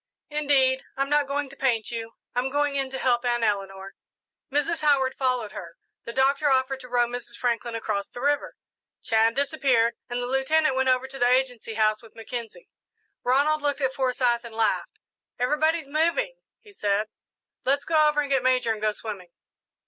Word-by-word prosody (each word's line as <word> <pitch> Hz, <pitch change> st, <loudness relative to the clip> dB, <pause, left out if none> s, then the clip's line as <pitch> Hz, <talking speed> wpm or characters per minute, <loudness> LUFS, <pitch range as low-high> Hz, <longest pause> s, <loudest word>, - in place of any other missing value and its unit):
"Indeed, 275 Hz, -3 st, +2 dB, 0.2 s
I'm 275 Hz, +1 st, -1 dB
not 295 Hz, -1 st, +3 dB
going 285 Hz, +1 st, -1 dB
to 275 Hz, -, -13 dB
paint 240 Hz, -6 st, 0 dB
you. 230 Hz, -1 st, -5 dB, 0.2 s
I'm 250 Hz, +2 st, 0 dB
going 290 Hz, +1 st, +1 dB
in 270 Hz, -1 st, -1 dB
to 265 Hz, -, -5 dB
help 245 Hz, -2 st, +1 dB
Aunt 240 Hz, -1 st, 0 dB
Eleanor." 195 Hz, -2 st, -2 dB, 0.6 s
Mrs. 295 Hz, +4 st, 0 dB
Howard 275 Hz, -3 st, +3 dB
followed 250 Hz, -6 st, -1 dB
her. 170 Hz, 0 st, -9 dB, 0.3 s
The 235 Hz, -, -5 dB
Doctor 275 Hz, +4 st, +2 dB
offered 265 Hz, 0 st, +1 dB
to 250 Hz, -1 st, -12 dB
row 245 Hz, 0 st, +3 dB
Mrs. 240 Hz, 0 st, -6 dB
Franklin 235 Hz, -1 st, -1 dB
across 210 Hz, -3 st, -2 dB
the -, -, -9 dB
river, 285 Hz, +3 st, 0 dB, 0.5 s
Chan 225 Hz, +1 st, +3 dB
disappeared, 270 Hz, -5 st, +2 dB, 0.2 s
and 245 Hz, 0 st, -2 dB
the 245 Hz, -, -2 dB
Lieutenant 270 Hz, +3 st, +2 dB
went 260 Hz, 0 st, +2 dB
over 255 Hz, 0 st, +2 dB
to 270 Hz, 0 st, -10 dB
the 245 Hz, -, +4 dB
Agency 250 Hz, -3 st, 0 dB
House 215 Hz, -1 st, +2 dB
with 225 Hz, -2 st, -17 dB
Mackenzie. 235 Hz, -, -7 dB, 0.6 s
Ronald 285 Hz, +5 st, +2 dB
looked 290 Hz, 0 st, 0 dB
at 265 Hz, -1 st, +1 dB
Forsyth 250 Hz, -2 st, +1 dB
and 230 Hz, -2 st, -10 dB
laughed. 225 Hz, -1 st, 0 dB, 0.4 s
"Everybody's 300 Hz, +5 st, +1 dB
moving," 335 Hz, -, +1 dB, 0.3 s
he 420 Hz, -2 st, -17 dB
said. 205 Hz, -, 0 dB, 0.6 s
"Let's 280 Hz, +2 st, +1 dB
go 310 Hz, -2 st, +4 dB
over 295 Hz, 0 st, +1 dB
and 285 Hz, -1 st, -4 dB
get 270 Hz, -2 st, +3 dB
Major 255 Hz, -3 st, +2 dB
and 215 Hz, -, -8 dB
go 215 Hz, 0 st, +1 dB
swimming." 205 Hz, -5 st, -7 dB
260 Hz, 180 wpm, -25 LUFS, 235-280 Hz, 0.6 s, the